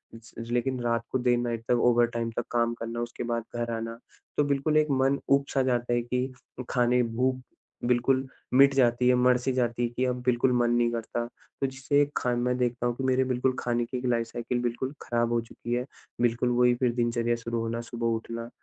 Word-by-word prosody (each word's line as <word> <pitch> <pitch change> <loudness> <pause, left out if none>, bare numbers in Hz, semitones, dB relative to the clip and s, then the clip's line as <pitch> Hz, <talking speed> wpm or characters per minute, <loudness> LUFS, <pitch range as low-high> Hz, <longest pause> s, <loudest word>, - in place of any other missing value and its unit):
स 115 0 -15 0.2
लेकिन 125 +1 0
रात 115 -1 0
को 130 - +1
देर 125 -1 +2
नाइट 120 -1 -2
तक 120 -1 +3
ओवरटाइम 115 -1 +1
तक - - -1
काम 120 -1 +1
करना 115 +1 -4
उसके 120 0 -5
बाद 115 -1 -2
घर 120 0 -2
आना 115 0 -5 0.4
तो 145 - +4
बिल्कुल 145 +2 +1
एक 155 0 +4
मन 135 +1 +2
ऊब-सा 140 0 +2
जाता 120 -1 0
है 120 - +2
कि 125 +2 -2 0.4
खाने 125 0 +3
भूख 130 +3 0 0.5
बिल्कुल 130 +2 +2 0.3
मिट 140 +1 +7
जाती 125 -2 +3
है, 125 - +5
मर-सी 125 +1 +3
जाती 120 -1 0
है 120 - +1
कि 125 +2 -1
अब 125 -1 -1
बिल्कुल 125 +1 +3
मन 120 -1 +2
नहीं 120 0 +2
करता। 120 0 -3 0.4
तो 135 - +2
जिससे 135 +2 +1
खान 120 -1 0
मैं 125 +1 +1
देखता 120 -1 0
हूँ 120 - -1
कि 135 - -5
मेरे 130 0 +3
बिल्कुल 130 0 0
खाने 120 -1 0
की 125 - -5
एक 125 - -5
लाइफ 115 -2 +1
साइकिल 120 +1 -3
बिल्कुल 120 +3 -2
खराब 120 0 0
हो 120 - +3
चुकी 120 +1 -6
है। 125 +1 0 0.4
बिल्कुल 120 +1 +2
वही 125 0 +4
फिर 120 -1 +1
दिनचर्या 120 -1 0
शुरू 115 0 -3
होना, 115 +1 -2
सुबह 120 0 -4
उठना, 115 +1 -6
120 Hz, 210 wpm, -27 LUFS, 120-130 Hz, 0.5 s, मिट